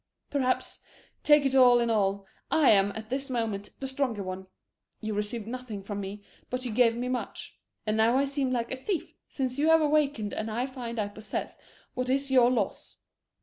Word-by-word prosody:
Perhaps, 260 -3 0 0.4
take 295 -1 +5
it 270 - +2
all 250 -2 +7
in 235 -1 +1
all, 200 -2 +1 0.2
I 310 -4 +5
am 200 -1 +4
at 220 +1 -8
this 270 +1 -2
moment 225 -5 -2
the 270 - -3
stronger 260 -6 -2
one. 185 0 -6 0.5
You 215 0 -3
received 210 +2 -2
nothing 230 -4 -6
from 205 0 -4
me, 200 +1 -7 0.3
but 255 0 -3
you 245 - -2
gave 230 0 +3
me 245 +1 -2
much. 250 0 -4 0.3
And 215 0 0
now 230 +3 +4
I 275 - +3
seem 275 -2 -1
like 235 -2 -1
a - - -1
thief 335 +5 -3 0.2
since 260 -1 -3
you 300 - +3
have 325 0 +6
awakened 290 -8 +1
and 215 +1 -3 0.2
find 240 -3 -6
I 210 -2 0
possess 210 +1 -4 0.4
what 255 0 -2
is 275 +1 0
your 250 -2 +6
loss. 225 -6 -2
245 Hz, 190 wpm, -28 LUFS, 215-265 Hz, 0.5 s, all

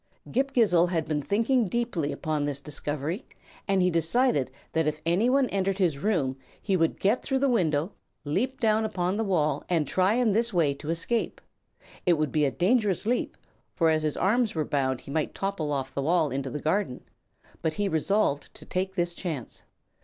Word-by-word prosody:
Ghip 270 +2 0
Ghisizzle 180 -8 +4
had 165 -3 0
been 150 -2 -1
thinking 225 - +1
deeply 185 -9 -1
upon 150 +1 -2
this 145 -1 -3
discovery, 150 - -4 0.4
and 195 -2 +3
he 180 - +3
decided 165 - +2 0.2
that 160 -1 +1
if 155 0 -1
anyone 245 +11 +3
entered 195 -1 0
his 170 -8 +1
room 140 -9 0 0.2
he 195 - 0
would 165 -2 +1
get 210 +6 +2
through 270 - 0
the 275 +1 +2
window, 170 - +1 0.3
leap 235 - -1
down 220 -1 +2
upon 185 -3 -1
the 225 - 0
wall 155 -8 +1
and 165 -5 +1
try 190 +7 +2
in 245 -3 +3
this 230 +3 +1
way 165 -7 +2
to 145 +2 -8
escape. 170 +8 -1 0.6
It 180 - +4
would 155 -3 0
be 150 -1 +2
a - - +2
dangerous 205 - +1
leap, 245 +3 -1 0.4
for 165 -2 +3
as 155 0 +2
his 155 -1 -1
arms 220 +2 +2
were 155 -1 0
bound 130 -3 0
he - - -10
might 155 +1 -1
topple 195 -7 -2
off 135 -2 -2
the 140 - -2
wall 160 0 +2
into 135 +1 -2
the 150 - -4
garden; 160 -3 -1 0.6
but 155 -1 -1
he 205 +3 0
resolved 160 -3 0
to - - -13
take 190 +1 -2
this 175 -2 0
chance. 160 - -5
175 Hz, 190 wpm, -27 LUFS, 150-210 Hz, 0.6 s, Ghisizzle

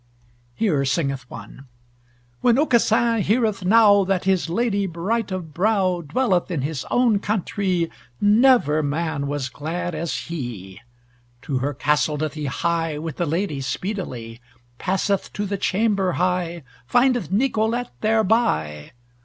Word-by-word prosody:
Here 155 - +1
singeth 135 -2 -1
one: 115 +5 -11 0.7
When 240 -1 +4
Aucassin 235 -5 +3
heareth 215 -1 +1
now 205 0 +6
That 190 -1 0
his 190 -3 +1
lady 200 +1 0
bright 195 +6 -2
of 175 -5 -5
brow 185 -1 +1
Dwelleth 185 - 0
in 160 -7 -2
his 145 -2 -4
own 240 -4 +3
countrie, 195 -4 -1 0.3
Never 210 - +4
man 145 -1 -2
was 145 -2 -2
glad 165 +7 -4
as 160 +1 -3
he. 115 - -7 0.6
To 135 -3 -2
her 140 +2 -2
castle 150 +1 +1
doth 155 -1 -2
he 155 -1 -5
hie 165 +2 -1
With 155 -1 -6
the 175 - -1
lady 160 -2 -1
speedily, 130 - -5 0.4
Passeth 195 +1 -1
to 205 - -3
the 200 -1 -3
chamber 195 -3 +1
high, 175 -2 -1 0.2
Findeth 245 - +2
Nicolete 230 +1 0
thereby. 215 - +1
180 Hz, 130 wpm, -22 LUFS, 150-210 Hz, 0.7 s, now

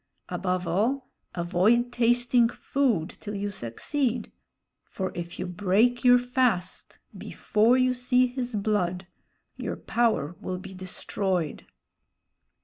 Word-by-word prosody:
Above 185 -1 -1
all, 225 +11 0 0.2
avoid 190 +8 +2
tasting 240 0 +3
food 240 - 0
till 210 -1 -6
you 200 +1 -3
succeed; 235 - -2 0.5
for 190 -1 -4
if 175 0 -6
you - - -3
break 205 +7 +2
your 245 0 +7
fast 245 -7 -1 0.2
before 225 +4 +2
you 255 0 +3
see 250 0 +3
his 250 -1 -4
blood, 195 -3 0 0.5
your - - -4
power 220 -9 0
will 185 0 -3
be 190 +1 -9
destroyed." 185 -2 -3
215 Hz, 115 wpm, -27 LUFS, 185-245 Hz, 0.5 s, your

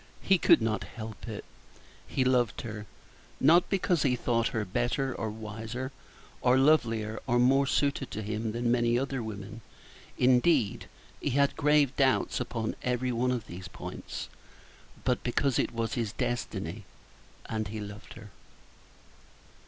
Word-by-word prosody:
He 190 -2 +4
could 115 - +5
not 110 -1 0
help 110 0 -8
it! 110 -3 -6 0.6
He 130 - 0
loved 125 -3 +2
her; 105 -2 -7 0.5
not 165 +6 +5
because 180 -4 +1
he 130 -4 +3
thought 115 -1 +1
her 110 -4 -2
better, 120 +6 -1
or 110 - -3
wiser, 110 +4 -5 0.5
or 125 +1 +4
lovelier, 115 -7 +2
or 120 - +3
more 135 +3 +4
suited 140 -2 0
to 110 - -5
him 110 +2 -2
than 120 +1 0
many 120 -1 +3
other 135 0 -1
women 110 0 -7 0.6
indeed, 125 -2 +3 0.3
he - - 0
had 140 +2 +2
grave 150 -2 +3
doubts 135 -2 +2
upon 115 -2 -3
every 125 0 0
one 120 +2 +1
of 125 -3 -1
these 90 -1 -8
points - - -7 0.8
but 125 -1 +1
because 125 +2 +1
it - - +1
was 115 -1 -2
his 115 -3 -2
destiny, 105 -5 -3 0.6
and 110 -1 -2
he 110 +2 -5
loved 105 0 -8
her. 110 -3 -12
120 Hz, 145 wpm, -29 LUFS, 110-130 Hz, 0.8 s, could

